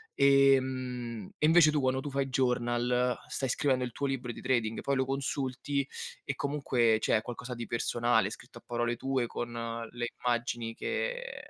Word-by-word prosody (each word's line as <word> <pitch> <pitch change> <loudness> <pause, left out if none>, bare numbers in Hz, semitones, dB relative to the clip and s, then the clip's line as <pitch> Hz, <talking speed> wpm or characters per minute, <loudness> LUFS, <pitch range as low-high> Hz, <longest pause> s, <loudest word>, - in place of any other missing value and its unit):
Ehm, 130 -5 +2
e - - +2
invece 165 -2 +7
tu 150 -1 +1
quando 130 0 +1
tu 145 - -5
fai 140 0 0
journal 125 -1 +1
stai 135 -2 -2
scrivendo 130 -1 +1
il 120 - -6
tuo 140 - -2
libro 130 -3 -2
di - - -9
trading, 120 -4 0
poi 140 - 0
lo 130 - +3
consulti 135 0 -2 0.4
e 140 - -3
comunque 125 -6 +2
cioè, - - +3
è - - -2
qualcosa 125 +1 -6
di 120 0 -5
personale, 120 +1 +1
scritto - - -11
a - - -27
parole 120 0 -1
tue, 130 -2 0
con 120 +1 -4 0.4
le 120 0 -3 0.2
immagini 120 -1 -1
che - - -3
125 Hz, 170 wpm, -30 LUFS, 120-135 Hz, 0.4 s, invece